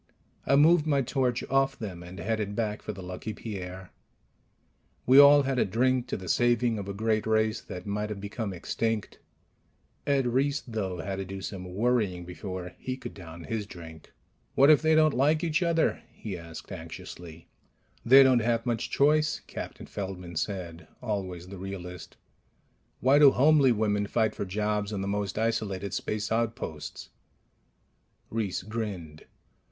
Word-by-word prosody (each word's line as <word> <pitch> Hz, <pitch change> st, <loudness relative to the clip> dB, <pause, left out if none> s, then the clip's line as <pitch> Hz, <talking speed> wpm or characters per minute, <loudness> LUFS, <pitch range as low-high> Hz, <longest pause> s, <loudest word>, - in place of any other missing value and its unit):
I 140 Hz, -, +5 dB
moved 155 Hz, +2 st, +5 dB
my 140 Hz, -3 st, +2 dB
torch 125 Hz, -1 st, 0 dB
off 135 Hz, 0 st, +1 dB
them 95 Hz, -6 st, -6 dB
and 90 Hz, +2 st, -10 dB
headed 105 Hz, +2 st, -2 dB
back 105 Hz, -2 st, -2 dB
for -, -, -5 dB
the 95 Hz, -2 st, -9 dB
Lucky 90 Hz, +4 st, -6 dB
Pierre. 95 Hz, -4 st, -7 dB, 1.1 s
We 130 Hz, +2 st, +7 dB
all 145 Hz, 0 st, +8 dB
had 135 Hz, -1 st, 0 dB
a -, -, +5 dB
drink 125 Hz, +5 st, +1 dB
to -, -, -3 dB
the 95 Hz, -, -9 dB
saving 120 Hz, +2 st, +2 dB
of 100 Hz, -, -6 dB
a 100 Hz, -, -4 dB
great 110 Hz, +1 st, 0 dB
race 110 Hz, 0 st, +1 dB
that 90 Hz, 0 st, -8 dB
might 105 Hz, +1 st, -2 dB
have 105 Hz, -2 st, -5 dB
become 100 Hz, +1 st, -4 dB
extinct. 110 Hz, +4 st, -2 dB, 0.9 s
Ed 140 Hz, -2 st, +2 dB
Reiss, 140 Hz, +4 st, +1 dB
though, 100 Hz, -6 st, -4 dB
had 95 Hz, +3 st, -4 dB
to 95 Hz, -, -4 dB
do 95 Hz, +1 st, -6 dB
some 90 Hz, -2 st, -7 dB
worrying 105 Hz, -6 st, +1 dB
before 90 Hz, 0 st, -6 dB
he 130 Hz, 0 st, -4 dB
could 120 Hz, -2 st, -8 dB
down 85 Hz, -2 st, -10 dB
his 105 Hz, +2 st, -3 dB
drink. 80 Hz, -4 st, -11 dB, 0.4 s
"What 140 Hz, +3 st, +7 dB
if 150 Hz, -, +6 dB
they 160 Hz, 0 st, +4 dB
don't 155 Hz, -1 st, +5 dB
like 150 Hz, +5 st, +2 dB
each 160 Hz, -1 st, +1 dB
other?" 170 Hz, -2 st, +1 dB
he 105 Hz, -4 st, -6 dB
asked 85 Hz, 0 st, -10 dB
anxiously. 85 Hz, -1 st, -9 dB, 0.6 s
"They 135 Hz, +3 st, +8 dB
don't 130 Hz, -2 st, +5 dB
have 115 Hz, 0 st, 0 dB
much 120 Hz, -3 st, -1 dB
choice," 150 Hz, +2 st, +2 dB
Captain -, -, -7 dB
Feldman 90 Hz, -3 st, -6 dB
said, 85 Hz, -1 st, -4 dB
always 95 Hz, -6 st, -4 dB
the 100 Hz, -1 st, -8 dB
realist. 90 Hz, -2 st, -8 dB, 0.8 s
"Why 135 Hz, +3 st, +5 dB
do 145 Hz, -2 st, +9 dB
homely 140 Hz, 0 st, +5 dB
women 105 Hz, -2 st, +1 dB
fight 110 Hz, 0 st, +1 dB
for -, -, -4 dB
jobs 105 Hz, +1 st, -1 dB
on 100 Hz, -2 st, -3 dB
the 95 Hz, -, -3 dB
most 100 Hz, 0 st, -2 dB
isolated 100 Hz, -4 st, -1 dB
space 105 Hz, 0 st, -3 dB
outposts?" 110 Hz, -10 st, -3 dB, 1.2 s
Reiss 105 Hz, -6 st, -2 dB
grinned. 100 Hz, -8 st, -5 dB
105 Hz, 160 wpm, -28 LUFS, 95-125 Hz, 1.2 s, do